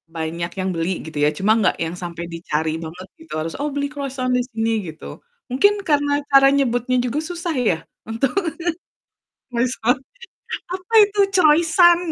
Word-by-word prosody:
banyak 165 +2 -3
yang 190 0 -1
beli 165 +3 -1
gitu 155 -2 -8
ya 150 - +5
cuma 200 +5 +1
nggak 200 - +2
yang 165 +2 -4
sampe 170 -1 -6
dicari 160 -1 -2
banget 175 +4 -8
gitu 325 - -11
harus, 165 +1 -4
"Oh, 295 - -1
beli 285 0 0
kroisan 270 -3 -3
di - - +2
sini," 225 0 -1 0.2
gitu. 155 0 -9 0.3
Mungkin 405 +11 +4
karena 290 -1 +2 0.2
cara 275 0 +7
nyebutnya 255 -2 +1
juga 270 +5 -1
susah 340 -2 -3
ya 160 - +1 0.3
untuk, 230 +4 0 1.2
mesen, 240 0 +1 0.8
"Apa 370 +4 -11
itu 410 0 -2
Croisan?" 340 +1 +5
250 Hz, 155 wpm, -21 LUFS, -, 1.2 s, cara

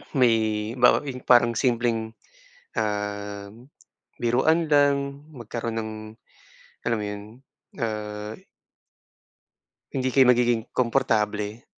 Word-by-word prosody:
may 125 -4 +5 0.4
bawa 125 +2 +4
yung 130 -2 -6
parang 120 -1 +5
simpleng, 115 -3 0 0.6
um, 105 -1 -3 0.7
biruan 155 +8 +2
lang 140 -1 +2
magkaroon 115 -1 -5
ng, 110 0 -4 0.9
alam 115 -2 +1
mo 105 - -3
yun, 105 0 -5 0.6
ah. 105 -1 -4 1.6
Hindi 130 -1 -1
kayo 130 -2 +5
magiging 120 -1 +3
komportable. 105 -2 0
115 Hz, 90 wpm, -25 LUFS, 105-125 Hz, 1.6 s, may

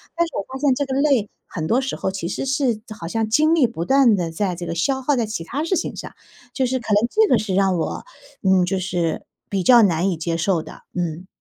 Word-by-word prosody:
但 340 0 +1
是 - - -12
我 - - -1
发 265 - -5
现 280 -1 +3
这 285 +2 -1
个 265 0 -1
累 270 -8 +2 0.2
很 160 -5 -5
多 240 +9 +2
时 265 - -3
候 190 - -2
其 190 -3 -4
实 190 - -3
是 265 -4 0 0.2
好 165 - -6
像 225 +5 -1
精 310 +8 +4
力 305 -6 +4
不 225 -8 -5
断 265 -3 +5
地 175 -4 -2
在 180 +2 -1
这 175 0 -6
个 165 - -3
消 265 +11 0
耗 285 +2 +1
在 235 -3 0
其 215 -6 -4
它 275 - -3
事 335 +4 0
情 - - -3
上， - - -8 0.4
就 265 - 0
是 260 +1 -1
可 225 -3 -2
能 210 +3 +3
这 435 +6 +3
个 240 - +4
是 200 -4 -2
让 195 -1 +3
我， 165 - -3 0.4
嗯， 190 -1 +4
就 190 - 0
是 175 -3 -2 0.2
比 195 -2 -1
较 240 +4 +7
难 180 -3 +2
以 180 - -1
接 165 +1 -2
受 170 0 +1
的， - - -12
嗯。 175 0 -3
210 Hz, 280 characters per minute, -21 LUFS, 180-265 Hz, 0.4 s, 较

